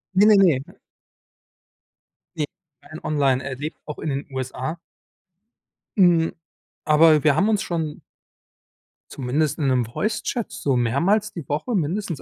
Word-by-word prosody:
Ne, 200 +2 +6
ne, 215 -1 +7
ne. 165 -9 +4 1.8
Ne, 150 - 0 0.4
rein 155 +1 -10
online 135 -3 +1
er 135 -1 -4
lebt 150 +4 -6
auch 150 - -7
in 155 - -3
den 140 +1 -3
USA. 130 +4 -4 1.2
Hm, 170 -3 +4 0.5
aber 155 0 +5
wir 150 -3 +4
haben 195 +7 +2
uns 215 -2 +2
schon 160 -3 -3 1.1
zumindest 145 +5 -1
in 145 - +1
'nem 125 -2 +2
Voicechat 220 +1 -2
so 135 -3 0
mehrmals 175 - +1
die 165 -7 -7
Woche 155 - -1
mindestens 170 0 -2
155 Hz, 135 wpm, -23 LUFS, 135-180 Hz, 1.8 s, ne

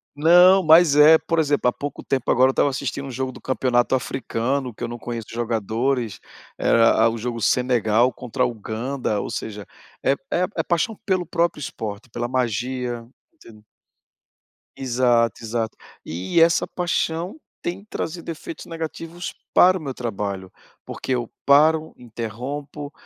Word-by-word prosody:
Não, 180 +5 +6
mas 160 -2 +6
é, 155 +2 +8
por 165 0 -1
exemplo, 145 -4 +2
há - - -1
pouco 145 0 -6
tempo 135 -3 -1
agora 130 +2 +5
eu - - +3
estava 140 - +2
assistindo 135 0 -4
um - - -6
jogo 130 +1 -3
do - - -12
campeonato 130 -1 +1
africano, 130 0 -2
que - - -9
eu - - -1
não 120 - -7
conheço 115 -2 -6
jogadores, 115 +1 -1 0.4
e - - -5
era 115 0 +5
um 115 - -4
jogo 115 +1 -4
Senegal 120 0 +2
contra 125 -1 -3
a - - +4
Uganda, 115 +1 -3
ou - - -5
seja, 105 -2 -5 0.4
é - - +3 0.2
é 180 - +1
é - - +1
paixão 200 +6 -1
pelo 185 -3 0
próprio 170 -2 0
esporte, 110 -3 -6
pela 120 +2 -3
magia, 125 0 -2 0.3
entendeu? 110 - -17 1.1
Exato, 120 -3 +1
exato. 115 0 -3 0.3
E 90 - -1
essa 165 +1 +4
paixão 175 - -2 0.2
tem 190 +4 -4
trazido 170 +1 -5
efeitos 165 +1 -8
negativos 165 +1 -6 0.2
para 185 +1 +6
o 175 - -9
meu 135 -3 -4
trabalho, 100 -6 -4 0.3
porque - - -6
eu 120 -2 -2 0.2
paro, 155 +3 +4
interrompo, 125 +6 -6
130 Hz, 155 wpm, -22 LUFS, 115-155 Hz, 1.1 s, é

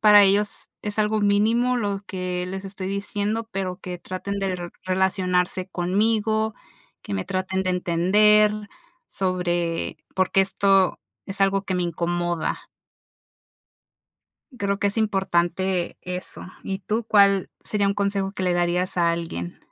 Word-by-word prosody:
para 210 -1 +8
ellos, 200 +1 +2
es 210 0 -3
algo 215 0 +2
mínimo 225 +5 +3
lo 200 -3 -2
que 180 -1 -3
les 190 +1 -5
estoy 190 -1 -5
diciendo, 205 +3 -2
pero 190 -2 -3
que 180 -2 -6
traten 200 +3 -5
de 195 - -1
r 175 -2 -3
relacionarse 185 -1 +1
conmigo, 215 +4 +1 0.5
que 100 - -5
me 95 - -2
traten 190 0 -1
de 185 - +1
entender 205 +5 +4 0.6
sobre 175 -3 -1 0.2
por 185 -1 +1
qué 195 - +4
esto 195 -1 +3 0.3
es 195 0 -5
algo 195 0 +3
que 190 - -2
me 180 - 0
incomoda. 175 0 -2 1.9
Creo 200 0 0
que 200 - +2
es 210 - -2
importante, 185 -3 0
eso. 180 0 -5 0.2
Y 195 0 -4
tú, 215 +4 -2
¿cuál 200 -2 +5 0.2
sería 205 -2 +1
un 200 - 0
consejo 200 -1 0
que 190 - -5
le 180 -1 +2
darías 175 +1 0
a 170 -1 +4
alguien? 165 - -4
190 Hz, 145 wpm, -24 LUFS, 180-205 Hz, 1.9 s, para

